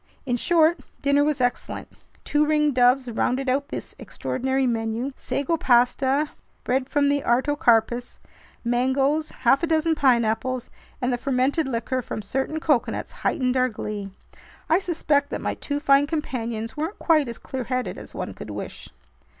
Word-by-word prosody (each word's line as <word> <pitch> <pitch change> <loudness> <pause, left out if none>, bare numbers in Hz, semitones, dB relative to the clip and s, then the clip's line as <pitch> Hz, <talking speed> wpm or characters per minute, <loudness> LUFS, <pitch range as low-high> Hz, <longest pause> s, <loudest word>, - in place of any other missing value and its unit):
In 245 -2 0
short, 330 +5 +3 0.2
dinner 280 0 +4
was 295 -1 0
excellent. 245 -1 -2 0.4
Two 295 0 +2
ringdoves 270 -4 +3
rounded 250 +3 -1
out 275 +2 +1
this - - -6
extraordinary 265 +1 -2
menu. 230 +2 -1
Sago 285 +4 -1
pasta, 265 +3 +2 0.3
bread 260 +1 0
from 290 -1 +2
the 285 0 +2
artocarpus, 240 -2 +2 0.5
mangoes, 270 +5 +1
half 260 +2 +2
a 335 - 0
dozen 320 0 +2
pineapples, 245 -3 +1 0.3
and 250 0 +1
the 245 - -1
fermented 270 +4 +1
liquor 255 +1 -1
from 215 - -6
certain 270 +9 -2
coconuts 295 -6 0
heightened 255 -2 -1
our 255 0 +3
glee. 210 -3 -5 0.6
I 330 - +5
suspect 305 -6 0
that - - -3
my - - -2
two 285 0 -3
fine 280 -1 +4
companions 235 -8 -3
weren't 320 +7 -3
quite 310 -5 +3
as 235 - -5
clearheaded 255 -1 -3
as - - -11
one - - -4
could - - -9
wish. - - -7
265 Hz, 150 wpm, -24 LUFS, 245-295 Hz, 0.6 s, I